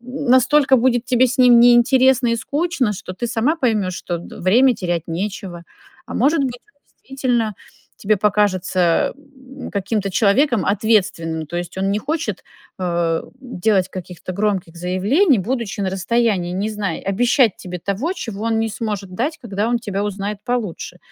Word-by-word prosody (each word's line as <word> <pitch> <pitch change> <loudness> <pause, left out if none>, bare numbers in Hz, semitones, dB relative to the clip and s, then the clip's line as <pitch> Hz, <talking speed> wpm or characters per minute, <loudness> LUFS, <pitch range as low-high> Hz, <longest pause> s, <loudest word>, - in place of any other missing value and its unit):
настолько 265 +2 +3
будет 245 -1 +2
тебе 255 0 +3
с 250 - -3
ним 250 -2 +6
неинтересно 245 +1 +5
и 230 - +1
скучно, 280 -3 -1
что 185 -1 -7
ты 240 +6 -4
сама 245 +7 0
поймёшь, 215 - 0
что 175 -2 -4
д - - -11
время 245 +8 +4
терять 175 -3 -3
нечего. 180 0 -5 0.4
А - - -8
может 280 +3 +2
быть 245 -2 -4 0.4
и, - - -29
действительно, 240 -5 0 0.4
тебе 210 +1 +1
покажется, 185 -4 +1
м, 275 -2 -12
каким-то 200 0 -2
человеком 220 - +2
ответственным. 185 -7 0
То 175 - -6
есть 175 +1 -5
он 195 +1 0
не 205 - 0
хочет, 315 +7 -3 0.3
э, 170 -2 -1 0.2
делать 205 -6 0
каких-то 185 0 -8
громких 195 -4 -2
заявлений, 205 - +2
будучи 225 +1 -3
на 190 - -1
расстоянии, 195 -2 0
не 195 +4 -2
зная, 200 -5 -3
обещать 235 +3 +2
тебе 180 -1 -7
того, 200 - -2
чего 225 - -6
он 225 -1 +1
не 225 - 0
сможет 205 -3 -5
дать, 290 - -2
когда 215 -4 -3
он 240 - +1
тебя 205 -3 -3
узнает 205 0 -4
получше. 215 -7 -3
215 Hz, 160 wpm, -20 LUFS, 185-250 Hz, 0.4 s, ним